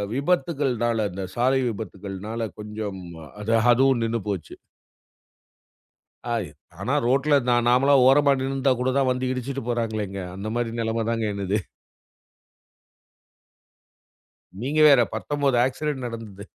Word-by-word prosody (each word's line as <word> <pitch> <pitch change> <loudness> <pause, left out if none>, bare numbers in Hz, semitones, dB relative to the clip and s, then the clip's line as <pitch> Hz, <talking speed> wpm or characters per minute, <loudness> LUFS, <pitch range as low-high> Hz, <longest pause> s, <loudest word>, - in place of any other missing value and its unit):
விபத்துக்கள்னால, 135 -8 0
இந்த 95 +1 -5
சாலை 130 +2 +2
விபத்துக்கள்னால, 105 +1 -6 0.2
கொஞ்சம் 105 -2 -6 0.4
அது 110 +2 -1 0.2
அதுவும் 130 -1 +3
நின்னு 115 +1 -1
போச்சு. 95 -6 -4 1.8
ஆயி 110 -8 -1 0.3
ஆனா 120 +8 -1
ரோட்ல 140 +4 +2
நான் 120 -1 +3
நார்மலா 135 +3 +4
ஓரமா 140 +2 +5
நின்னுருந்தா 135 0 +1
கூட 130 +1 +1
தான் 135 -1 +2
வந்து 125 0 -1
இடிச்சிட்டு 130 +1 -4
போறாங்களேங்க. 110 -4 -2 0.2
அந்த 100 +2 -5
மாதிரி 120 -1 -1
நிலமதாங்க 115 0 -1
என்னுது. 100 +1 -1 3.0
நீங்க 145 +5 0
வேற 140 -4 +7
19 145 -3 0
ஆக்ஸிடன்ட் 135 0 -2
நடந்தது. 110 -4 -8
120 Hz, 110 wpm, -24 LUFS, 110-135 Hz, 3.0 s, வேற